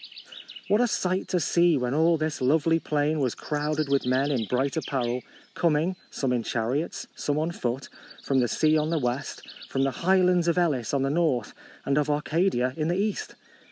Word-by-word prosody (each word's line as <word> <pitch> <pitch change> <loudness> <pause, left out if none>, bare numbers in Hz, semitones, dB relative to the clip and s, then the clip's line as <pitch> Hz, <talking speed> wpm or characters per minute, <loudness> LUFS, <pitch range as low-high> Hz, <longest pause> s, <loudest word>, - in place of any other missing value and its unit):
What 210 +3 +3
a 245 - +3
sight 185 -3 -1
to 180 - 0
see, 170 0 +3
when 125 0 -1
all 165 +2 +3
this 155 -2 -3
lovely 160 +5 +3
plain 150 0 0
was 130 -4 0
crowded 150 0 -2
with 140 0 +1
men 130 +3 +2
in 120 -5 0
bright 130 +5 -1
apparel, 125 -6 -2 0.3
coming, 170 +2 +1
some 130 -3 -1
in 120 - +1
chariots, 120 +8 -2
some 145 0 -1
on 160 +2 0
foot, 130 -4 -3 0.4
from 135 -1 +1
the 125 - +2
sea 155 +5 +2
on 155 +1 -1
the 165 - +1
west, 130 0 -3 0.3
from 135 - 0
the 135 - +1
highlands 180 -1 +3
of 170 - +2
Elis 145 -10 +1
on 135 - +1
the 135 - 0
north 150 -8 0 0.3
and 140 +1 +2
of 150 0 -1
Arcadia 150 -3 +1
in 155 -1 -1
the 175 +2 0
east 205 +1 -2
150 Hz, 190 wpm, -26 LUFS, 130-165 Hz, 0.4 s, What